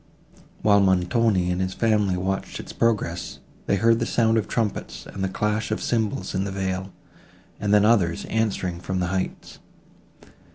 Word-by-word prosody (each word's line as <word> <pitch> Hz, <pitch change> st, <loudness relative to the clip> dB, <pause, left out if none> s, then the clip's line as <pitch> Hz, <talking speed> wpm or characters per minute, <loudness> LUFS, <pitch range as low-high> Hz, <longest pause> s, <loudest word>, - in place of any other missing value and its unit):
While 100 Hz, -1 st, +5 dB
Montoni 95 Hz, 0 st, +2 dB
and 90 Hz, +1 st, -1 dB
his 95 Hz, 0 st, -2 dB
family 105 Hz, -5 st, +2 dB
watched 95 Hz, +1 st, -3 dB
its -, -, -8 dB
progress, 105 Hz, -7 st, -1 dB, 0.3 s
they -, -, +3 dB
heard 115 Hz, +3 st, +3 dB
the 115 Hz, -, -1 dB
sound 115 Hz, -1 st, +3 dB
of 105 Hz, -, -3 dB
trumpets 110 Hz, -4 st, -3 dB
and 95 Hz, -, -6 dB
the 95 Hz, -, 0 dB
clash 105 Hz, +2 st, -1 dB
of 110 Hz, -, -1 dB
cymbals 110 Hz, -5 st, -1 dB
in 95 Hz, -, 0 dB
the 100 Hz, -, -3 dB
vale, 95 Hz, 0 st, -3 dB, 0.7 s
and 105 Hz, -, -1 dB
then 105 Hz, 0 st, +5 dB
others, 95 Hz, -7 st, +2 dB
answering 100 Hz, -6 st, -1 dB
from 95 Hz, +1 st, -3 dB
the 90 Hz, -1 st, -1 dB
heights. 95 Hz, -1 st, -4 dB
100 Hz, 165 wpm, -24 LUFS, 95-110 Hz, 0.7 s, While